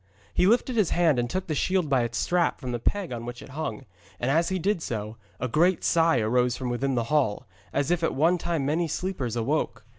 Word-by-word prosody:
He 180 - +3
lifted 245 +3 +2
his 210 -6 +3
hand 165 -7 +3
and 120 0 -1
took 185 +7 -2
the 160 - -2
shield 180 +3 +1
by 135 -3 +2
its 120 -2 -2
strap 175 -1 +1
from 130 -3 -5
the 120 - -2
peg 195 - -1
on 115 -1 -5
which 120 0 -7
it - - -12
hung, 140 -6 -5 0.3
and 125 +3 0
as 165 +3 +2
he 190 - 0
did 190 0 0
so, 110 -4 -4 0.2
a 125 - -1
great 170 +8 +2
sigh 165 -4 +3
arose 125 +2 +1
from 125 -2 -3
within 130 +2 -1
the 120 - +1
hall, 130 -6 +1 0.3
as 140 +3 0
if 175 -1 +1
at 165 - 0
one 165 +6 +3
time 165 -5 -1
many 165 +4 +1
sleepers 145 - -3
awoke. 130 +7 -1
145 Hz, 235 wpm, -26 LUFS, 120-175 Hz, 0.3 s, He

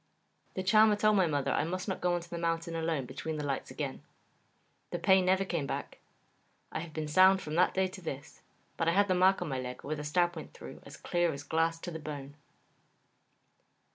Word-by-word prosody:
The 185 - -2
Charmer 215 +2 +5
told 215 +1 +3
my 185 -3 +4
mother 145 -3 0
I - - +1
must 185 +4 -3
not 190 - -3
go 180 0 +2
on 175 - -2
the 170 0 -7
mountain 165 0 -1
alone 160 -4 -1
between 155 +5 -5
the 150 - -3
lights 140 -1 -3
again. - - -5 0.9
The - - -3
pain 190 +1 +4
never 190 +1 +3
came 170 -7 -2
back. - - -5 0.7
I - - -3
have 165 0 -7
been 155 0 -4
sound 185 +5 +6
from 155 -4 -6
that 180 +3 +3
day 190 0 +3
to 190 0 -10
this, 145 -3 -7 0.4
but 165 - 0
I 165 - +4
have 200 +2 +4
the 185 - +2
mark 185 +1 +4
on - - -5
my 130 -2 -2
leg 125 0 -6
where 155 +2 -3
the 150 - -6
stab 175 +3 +1
went 160 - -9
through - - -10
as - - -11
clear 175 -1 0
as 140 +1 -7
glass 165 +2 0
to 175 - -5
the 160 - -6
bone. 145 -2 -7
170 Hz, 220 wpm, -31 LUFS, 155-185 Hz, 0.9 s, sound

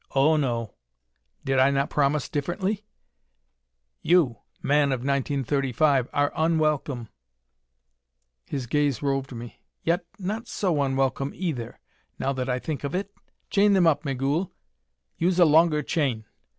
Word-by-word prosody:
Oh, 145 +4 +4
no: 120 -7 -1 0.7
did 135 -1 +2
I 130 +1 +5
not 140 0 0
promise 145 0 +1
differently? 190 +8 -2 1.1
You, 160 -10 +3 0.3
man 145 0 +3
of 130 -2 -1
1935, 140 0 +1
are 145 0 +1
unwelcome." 155 -7 0 1.4
His 135 -3 -3
gaze 145 +2 0
roved 135 -1 -1
me. 120 -1 -9 0.2
"Yet 175 +2 +1
not 215 +5 -4
so 180 -8 0
unwelcome, 135 0 0
either, 150 -11 -4 0.4
now 135 - -1
that 130 -1 -3
I 125 - +1
think 145 +3 -4
of 140 +4 -3
it. 200 +2 -3 0.4
Chain 205 0 +4
them 190 -3 +4
up, 150 -2 +3
Migul; 140 +5 -1 0.7
use 180 +1 +2
a 175 - +7
longer 155 0 +4
chain. 130 -9 -1
145 Hz, 130 wpm, -25 LUFS, 135-165 Hz, 1.4 s, a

